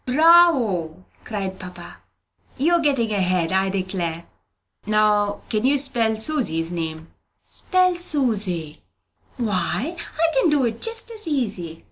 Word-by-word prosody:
"Bravo!" 255 - +3 0.2
cried 195 -3 -5
papa. 180 -1 -10 0.6
"You're 335 +5 +3
getting 270 -8 +1
ahead, 185 -4 0
I 190 0 +2
declare! 185 -3 -3 0.6
Now 210 -1 +2
can 215 -1 -1
you 275 +3 +3
spell 235 -5 +1
Susy's 215 - -1
name?" 160 -1 -5 0.3
"Spell 365 -1 +1
Susy? 215 - -1 0.6
Why, 220 - -1
I 330 -1 -2
can 335 - +3
do 290 -4 +2
it 230 -1 -3
just 455 0 -2
as 430 -5 -4
easy!" 200 - -2
215 Hz, 120 wpm, -22 LUFS, 185-295 Hz, 0.6 s, Bravo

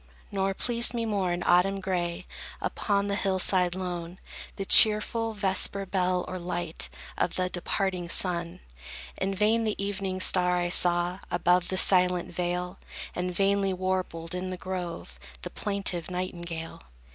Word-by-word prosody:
Nor 195 -1 -1
pleased 240 +2 +3
me 230 -1 -2
more, 200 -5 -1
in 175 0 -3
autumn 195 +3 +3
gray, 180 -1 -3 0.3
Upon 200 -1 -1
the 200 - -2
hill 195 -1 -1
side 180 -1 +2
lone, 180 -1 -5 0.4
The 195 - -5
cheerful 220 +2 +6
vesper 195 -1 +1
bell, 185 -1 -1
or 185 - -5
light 175 -1 -2 0.3
Of - - -1
the 185 0 -2
departing 180 0 -2
sun. 170 -1 0 0.6
In 195 0 -2
vain 220 +3 +2
the 215 -2 -1
evening 195 -1 -3
star 180 -1 +3
I 175 0 -1
saw 175 +1 +2
Above 175 0 +1
the 185 - -2
silent 180 -2 +3
vale, 180 +1 -3 0.3
And 180 0 -3
vainly 195 +1 +1
warbled 185 -2 -3
in 180 +1 -4
the 185 - -5
grove 175 - -6 0.2
The - - -6
plaintive 195 -4 -2
nightingale. 170 -2 -6
185 Hz, 145 wpm, -27 LUFS, 175-195 Hz, 0.6 s, cheerful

